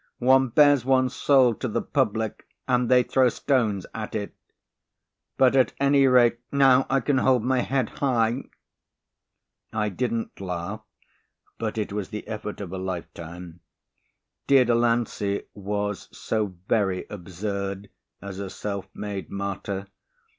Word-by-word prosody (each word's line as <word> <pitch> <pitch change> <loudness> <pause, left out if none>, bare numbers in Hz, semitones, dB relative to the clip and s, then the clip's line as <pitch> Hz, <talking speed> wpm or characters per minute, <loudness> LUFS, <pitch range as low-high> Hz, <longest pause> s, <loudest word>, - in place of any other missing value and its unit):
"One 130 +1 +4
bares 145 +2 +5
one's 130 0 +2
soul 130 -4 +4
to - - -4
the - - -1
public - - -1 0.2
and 125 -1 +2
they 125 -1 +5
throw 130 0 +3
stones 115 -9 0
at - - -5
it. - - -3 1.0
But 130 0 +4
at 130 -2 +3
any 140 0 +4
rate, 120 -2 +4
now 135 -2 +5
I 135 0 +2
can 135 +2 +1
hold 130 -4 +3
my 130 +1 +1
head 130 -1 0
high." 120 -2 0 1.3
I 105 -1 -1
didn't 115 +1 -3
laugh, 95 +3 -4 0.8
but 110 -1 -3
it 105 -2 -2
was 105 -2 -3
the 105 -1 -7
effort 105 -1 -5
of 95 -2 -6
a 95 - -4
lifetime. 85 -1 -7 0.9
Dear 135 -2 +6
Delancey 115 -4 +1
was 105 0 -3
so 105 -4 -2
very 95 -5 +1
absurd 100 +1 -5 0.3
as 100 -1 -7
a 100 -1 -4
self 100 0 -5
made 100 -2 -5
martyr. 100 0 -4
110 Hz, 135 wpm, -25 LUFS, 100-130 Hz, 1.3 s, Dear